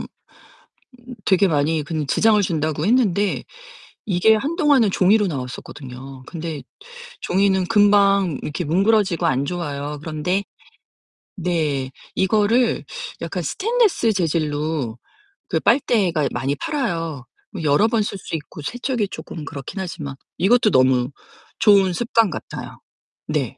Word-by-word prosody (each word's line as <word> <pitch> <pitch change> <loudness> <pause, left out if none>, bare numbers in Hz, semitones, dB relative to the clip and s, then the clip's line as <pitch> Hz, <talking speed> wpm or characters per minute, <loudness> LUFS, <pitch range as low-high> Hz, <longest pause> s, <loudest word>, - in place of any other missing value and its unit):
음 - - -6 1.2
되게 195 0 +4
많이 155 0 +1
그런 155 0 -3
지장을 215 - +3
준다고 155 -3 -1
했는데 210 -4 +2 0.6
이게 200 +3 +4
한동안은 280 -3 +2
종이로 200 +3 +3
나왔었거든요. 135 -2 -7
근데 160 -3 -6 0.6
종이는 190 0 +2
금방 200 -5 +4
이렇게 155 +4 -3
뭉그러지고 190 +2 +2
안 135 +1 +1
좋아요. 145 -3 -4
그런데 160 +6 -2 0.9
네 155 -7 -1 0.2
이거를 220 +5 +2 0.4
약간 - - -3
스테인리스 420 - +1
재질로 150 - -1 0.5
그 - - +1
빨대가 185 - +2
많이 135 +3 -1
팔아요. 165 - -3 0.3
뭐 190 -6 -6
여러 150 +9 +4
번 225 -1 +1
쓸 200 - -4
수 180 - -6
있고 155 0 -8
세척이 240 - -2
쪼끔 160 - -8
그렇긴 145 +5 -7
하지만 150 -6 -6 0.2
이것도 215 +3 +4
너무 130 -2 +3 0.5
좋은 200 -3 +5
습관 230 +1 +2
같아요. - - -7 0.5
네. - - -2
180 Hz, 275 characters per minute, -21 LUFS, 150-210 Hz, 1.2 s, 좋은